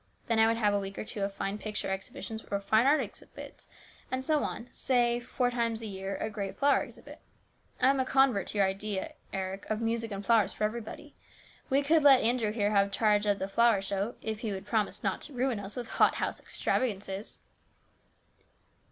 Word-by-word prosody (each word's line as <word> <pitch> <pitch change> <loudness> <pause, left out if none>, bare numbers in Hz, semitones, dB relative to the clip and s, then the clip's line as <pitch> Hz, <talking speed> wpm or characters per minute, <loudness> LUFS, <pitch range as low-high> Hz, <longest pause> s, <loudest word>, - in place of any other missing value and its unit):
Then 230 -1 +1
I 220 - +6
would 230 0 +1
have 210 -3 +2
a 205 - +2
week 195 0 -6
or - - -3
two 215 -1 -5
of 195 0 0
fine 195 +1 -3
picture 210 -2 -4
exhibitions 220 +3 -5
or 200 - 0
fine 220 +5 +3
art 300 +2 +5
exhibits - - -10 0.4
and 260 0 -3
so 305 0 +2
on, - - -4
with, 245 - -22
say 240 -2 +2
four 245 +1 -1
times 230 -2 -1
a - - -4
year, 195 -1 -4
a - - -3
great 200 -2 -5
flower 285 0 +4
exhibit. - - -10 0.6
I 260 +1 +5
am 275 - 0
a - - +3
convert 265 -6 +3
to - - -5
your 200 - +5
idea, 195 0 -3 0.2
Eric, 190 +1 -4
of 215 0 0
music 230 0 -1
and 200 0 -5
flowers 225 -3 +3
for - - -4
everybody. 235 +7 -4 0.6
We 275 +2 +3
could 315 +3 +4
let 275 -3 +7
Andrew 230 -1 +2
here 210 -2 0
have 200 -1 +3
charge 210 0 +2
of 205 -1 +3
the 190 - -3
flower 230 +1 +4
show, 200 +3 -2
if 220 -1 -3
he 220 -2 -3
would 190 0 -5
promise 210 0 -1
not - - -1
to 295 - -7
ruin 250 -3 0
us 200 0 -6
with 245 -2 -5
hot - - +3
house - - -2
extravagances." 200 -4 -2
220 Hz, 210 wpm, -30 LUFS, 200-245 Hz, 0.6 s, let